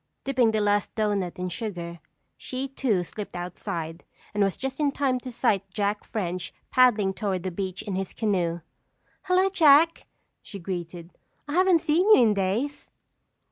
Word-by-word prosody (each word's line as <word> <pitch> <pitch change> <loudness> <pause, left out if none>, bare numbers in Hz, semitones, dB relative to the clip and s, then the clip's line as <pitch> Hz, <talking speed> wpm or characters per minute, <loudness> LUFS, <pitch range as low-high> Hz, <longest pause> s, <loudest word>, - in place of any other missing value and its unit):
Dipping 255 -4 +2
the 220 -1 +1
last 205 0 +1
doughnut 200 -4 -1
in 180 0 -3
sugar, 175 -4 -5 0.4
she 260 +1 -5
too 245 -8 0
slipped 205 +4 -8
outside 170 -2 -5 0.3
and 210 - 0
was 195 -1 0
just 265 +1 -4
in 290 -2 +2
time 270 -3 0
to 255 0 -8
sight 200 -4 0
Jack 205 +2 -1
French 180 -4 -3 0.2
paddling 220 -7 +4
toward 190 -4 -2
the 185 - -3
beach 190 +1 -4
in 200 - -4
his 190 0 -3
canoe. 175 -6 -1 0.6
"Hello, 370 +1 +3
Jack," 325 -2 +5 0.3
she 200 - -9
greeted, 175 -2 -6 0.4
"I 290 - -4
haven't 365 -1 +4
seen 340 +5 +2
you - - +5
in 220 -2 +4
days." 205 +9 -2
205 Hz, 160 wpm, -26 LUFS, 185-265 Hz, 0.6 s, Jack